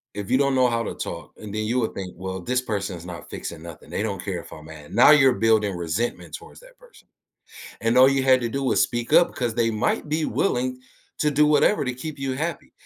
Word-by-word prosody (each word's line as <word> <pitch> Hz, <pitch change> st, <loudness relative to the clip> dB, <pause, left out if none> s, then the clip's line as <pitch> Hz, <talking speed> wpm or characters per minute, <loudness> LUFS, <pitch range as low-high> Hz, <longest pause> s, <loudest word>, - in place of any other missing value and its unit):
if 100 Hz, -1 st, -5 dB
you 130 Hz, -, +4 dB
don't 140 Hz, -1 st, +2 dB
know 130 Hz, -1 st, +4 dB
how 115 Hz, 0 st, 0 dB
to -, -, -5 dB
talk, -, -, -7 dB
and 105 Hz, -1 st, -9 dB
then 110 Hz, 0 st, -2 dB
you 120 Hz, +4 st, 0 dB
would 115 Hz, -, -1 dB
think, 95 Hz, -2 st, -7 dB
"Well, 95 Hz, 0 st, -5 dB
this 125 Hz, +7 st, 0 dB
person 100 Hz, -6 st, -3 dB
is 85 Hz, -, -11 dB
not 85 Hz, -2 st, -9 dB
fixing 85 Hz, -2 st, -7 dB
nothing, 85 Hz, -2 st, -11 dB
they -, -, -2 dB
don't 100 Hz, -4 st, -3 dB
care 95 Hz, -4 st, -3 dB
if -, -, -15 dB
I'm 75 Hz, -, -11 dB
mad." 80 Hz, -2 st, -12 dB
Now 125 Hz, -, +7 dB
you're 135 Hz, -4 st, +6 dB
building 110 Hz, -5 st, +1 dB
resentment 85 Hz, +8 st, -3 dB
towards -, -, -12 dB
that -, -, -19 dB
person. -, -, -20 dB, 0.8 s
And 115 Hz, +2 st, +2 dB
all 130 Hz, -, +8 dB
you 135 Hz, -1 st, +1 dB
had 130 Hz, -1 st, +4 dB
to 120 Hz, -, -2 dB
do 135 Hz, +4 st, -3 dB
was 130 Hz, -, +1 dB
speak 120 Hz, -1 st, -1 dB
up 175 Hz, -, +7 dB
because 120 Hz, -3 st, -3 dB
they 115 Hz, 0 st, +1 dB
might 110 Hz, +7 st, -1 dB
be 155 Hz, +1 st, 0 dB
willing 130 Hz, -7 st, -1 dB, 0.4 s
to 150 Hz, -, +2 dB
do 150 Hz, +1 st, +3 dB
whatever 150 Hz, +5 st, +3 dB
to 125 Hz, -, -2 dB
keep 150 Hz, +3 st, -7 dB
you 135 Hz, -1 st, -2 dB
happy, 160 Hz, +5 st, -4 dB
120 Hz, 245 wpm, -23 LUFS, 100-135 Hz, 0.8 s, all